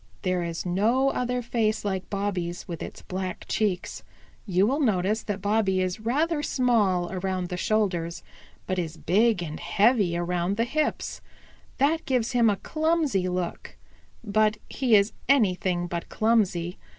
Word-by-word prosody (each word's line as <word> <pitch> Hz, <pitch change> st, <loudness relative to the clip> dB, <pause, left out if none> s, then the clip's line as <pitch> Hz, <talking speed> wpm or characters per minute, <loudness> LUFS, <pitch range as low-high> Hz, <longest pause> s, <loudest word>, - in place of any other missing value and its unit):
And 185 Hz, -2 st, -4 dB
there 180 Hz, -, 0 dB
is 170 Hz, 0 st, -4 dB
no 225 Hz, +9 st, +2 dB
other 250 Hz, 0 st, -1 dB
face 225 Hz, -3 st, 0 dB
like 190 Hz, -2 st, -2 dB
Bobby's 190 Hz, -4 st, -3 dB
with 170 Hz, -3 st, -6 dB
its -, -, -8 dB
black 185 Hz, 0 st, -5 dB
cheeks. 200 Hz, -5 st, -1 dB, 0.5 s
You 190 Hz, 0 st, +3 dB
will 270 Hz, +7 st, +1 dB
notice 215 Hz, -4 st, +1 dB
that 205 Hz, -2 st, -4 dB
Bobby 205 Hz, -2 st, +2 dB
is 185 Hz, +2 st, -1 dB
rather 295 Hz, +8 st, 0 dB
small 215 Hz, -11 st, +1 dB
around 185 Hz, -1 st, -2 dB
the 180 Hz, -, -3 dB
shoulders, 175 Hz, -4 st, -1 dB, 0.4 s
but 185 Hz, 0 st, -1 dB
is 165 Hz, -2 st, -4 dB
big 205 Hz, +1 st, +2 dB
and 155 Hz, -2 st, -6 dB
heavy 205 Hz, -5 st, +2 dB
around 175 Hz, +2 st, -1 dB
the 230 Hz, -, +2 dB
hips. 305 Hz, +5 st, -2 dB, 0.6 s
That 300 Hz, +4 st, +2 dB
gives 250 Hz, -2 st, +1 dB
him 240 Hz, -3 st, +4 dB
a 205 Hz, -, +2 dB
clumsy 310 Hz, -, 0 dB
look, 180 Hz, -1 st, -4 dB, 0.5 s
but 215 Hz, 0 st, +2 dB
he 250 Hz, -5 st, +3 dB
is 200 Hz, +1 st, +3 dB, 0.2 s
anything 185 Hz, -8 st, +2 dB
but 170 Hz, -1 st, -5 dB
clumsy. 195 Hz, -6 st, +1 dB
200 Hz, 150 wpm, -26 LUFS, 180-235 Hz, 0.6 s, him